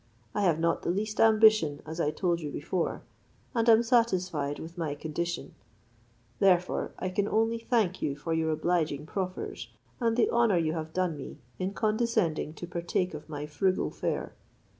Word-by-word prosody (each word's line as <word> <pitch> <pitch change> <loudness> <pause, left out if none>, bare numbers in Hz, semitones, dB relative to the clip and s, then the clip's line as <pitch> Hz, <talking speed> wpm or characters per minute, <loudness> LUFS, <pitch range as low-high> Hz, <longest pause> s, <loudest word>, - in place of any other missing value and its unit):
I - - 0
have 175 -6 +3
not 165 0 +1
the - - -3
least 210 +4 -2
ambition, 215 -9 +5
as 160 +2 -6
I 150 - +2
told 170 +1 0
you 150 - -4
before; 165 +5 -2 0.5
and 230 -1 +2
am 225 +1 +7
satisfied 185 - +1
with 165 +1 -9
my 160 -5 -2
condition: 170 +3 -4 0.9
therefore, 180 -2 +2
I 185 - -2
can 200 +2 0
only 225 +2 +1
thank 225 -6 0
you 140 - -1
for 165 +3 -3
your 160 0 +1
obliging 155 -2 0
proffers, 185 - -4 0.3
and 230 -1 +1
the 240 - +3
honour 235 -5 +3
you 160 -2 +1
have 160 -1 -4
done 180 -2 0
me 140 - -8 0.2
in 190 +2 -2
condescending 215 -9 0
to 175 - -6
partake 175 +1 -2
of 155 +1 -8
my 145 -1 -4
frugal 185 +6 0
fare. - - -3
175 Hz, 170 wpm, -29 LUFS, 155-215 Hz, 0.9 s, am